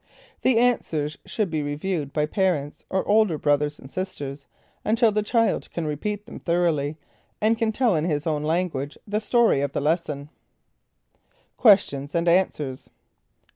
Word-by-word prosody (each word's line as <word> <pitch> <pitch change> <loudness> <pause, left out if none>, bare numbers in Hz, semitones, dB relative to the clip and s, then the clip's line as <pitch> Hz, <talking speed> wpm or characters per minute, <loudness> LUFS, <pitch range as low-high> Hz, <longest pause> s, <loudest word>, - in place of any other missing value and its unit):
The 255 -3 +3
answers 160 -11 +1
should 210 -6 -1
be 155 -2 0
reviewed 145 +1 -3
by 150 +1 +1
parents, 155 -4 -1
or 190 - -1
older 210 -6 +3
brothers 145 0 +1
and 135 - -12
sisters, 145 -7 -5 0.4
until 225 +1 +3
the 210 +1 +1
child 230 +2 +1
can 170 - -4
repeat 205 +8 -3
them - - -9
thoroughly, 165 -4 0 0.4
and 220 +2 +3
can 225 -1 0
tell 230 -3 +2
in 155 0 0
his 150 -2 -1
own 155 -3 0
language, 155 -3 -1
the 210 0 -1
story 225 - +3
of 140 -1 -2
the - - 0
lesson. 150 -2 -1 1.3
Questions 160 - +3
and 170 +1 +1
Answers. 155 -7 +1
170 Hz, 150 wpm, -24 LUFS, 145-210 Hz, 1.3 s, The